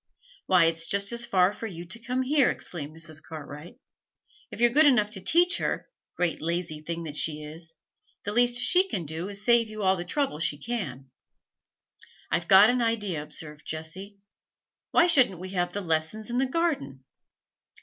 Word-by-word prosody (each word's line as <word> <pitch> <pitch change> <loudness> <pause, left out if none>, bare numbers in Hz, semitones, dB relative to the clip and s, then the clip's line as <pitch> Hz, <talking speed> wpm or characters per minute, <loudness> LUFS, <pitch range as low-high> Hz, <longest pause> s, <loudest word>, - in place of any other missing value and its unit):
'Why, 180 -3 +5
it's 165 0 0
just 200 +1 +1
as 235 0 -2
far 185 -3 +3
for 225 - -6
you 175 -4 -8
to 230 - -8
come 250 +2 -2
here,' 280 0 +3
exclaimed 155 -2 -6
Mrs. 155 -1 -5
Cartwright. 155 - -10 0.7
'If - - -10
you're 240 0 +4
good 300 +4 +6
enough 215 -6 +3
to 195 -4 -6
teach 350 - +3
her - - -3 0.2
great, 175 -2 -1
lazy 165 -1 -3
thing 170 +2 -5
that 150 -2 -7
she 150 0 -2
is! 160 +2 -10 0.5
the 205 - -2
least 240 +2 +4
she 360 +10 +4
can 180 - -3
do 160 +5 -5
is 200 - -4
to 200 - -3
save 235 -1 +4
you 215 -1 -6
all 190 0 +4
the 175 - -4
trouble 275 - -2
she 150 -2 -1
can.' 150 - -5 1.2
'I've 170 +2 0
got 200 +4 +8
an 250 0 0
idea,' 210 -8 -1
observed 150 0 -10
Jessie. 175 +6 -7 0.7
'Why 340 - +5
shouldn't 260 - +3
we 185 +1 -6
have 175 -1 -1
lessons 190 +4 -2
in 245 - 0
the 265 - +2
garden?' 265 - -1
190 Hz, 180 wpm, -27 LUFS, 160-235 Hz, 1.2 s, got